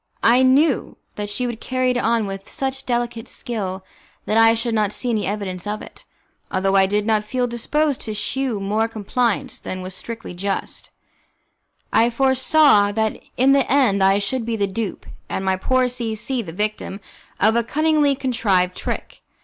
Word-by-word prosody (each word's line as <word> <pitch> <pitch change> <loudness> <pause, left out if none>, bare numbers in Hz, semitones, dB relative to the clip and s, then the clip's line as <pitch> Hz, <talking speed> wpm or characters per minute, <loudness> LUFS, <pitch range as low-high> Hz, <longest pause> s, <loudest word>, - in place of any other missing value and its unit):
I 240 +3 +5
knew 265 +2 +3 0.2
that 205 -1 -4
she 250 +5 -2
would 235 -2 -4
carry 255 -1 0
it 250 - -1
on 230 -2 +1
with 195 0 -7
such 270 0 -3
delicate 240 -2 -2
skill 190 -5 -4 0.4
that 215 - 0
I 225 0 +6
should 230 0 -2
not 210 -2 +1
see 245 +3 -2
any 215 -4 0
evidence 195 -2 -4
of 210 +1 -3
it. - - -12 0.5
Although 195 +1 +1
I 195 -1 +5
did 205 +1 0
not 215 -1 +2
feel 250 +4 -1
disposed 275 +5 0
to 215 -2 -4
shew 250 +1 -1
more 210 +3 0
compliance 225 +1 -1
than 185 0 -6
was 185 +1 -6
strictly 225 0 -7
just, 195 +2 -3 1.0
I 230 +1 +5
foresaw 265 -3 +4
that 220 0 -1 0.2
in 260 +2 +5
the 275 -2 +3
end 235 -9 +3
I 195 +1 +5
should 230 +5 -2
be 230 0 -2
the 205 -2 +1
dupe, 200 0 -4 0.2
and 190 - -3
my 190 0 +2
poor 255 +6 +1
C 235 -3 -3
C 240 +4 -1
the 175 -7 -8
victim, 210 +1 -3 0.4
of 220 +2 +4
a 235 - +3
cunningly 300 +2 +2
contrived 205 -9 +1
trick. - - -5
225 Hz, 180 wpm, -21 LUFS, 200-255 Hz, 1.0 s, I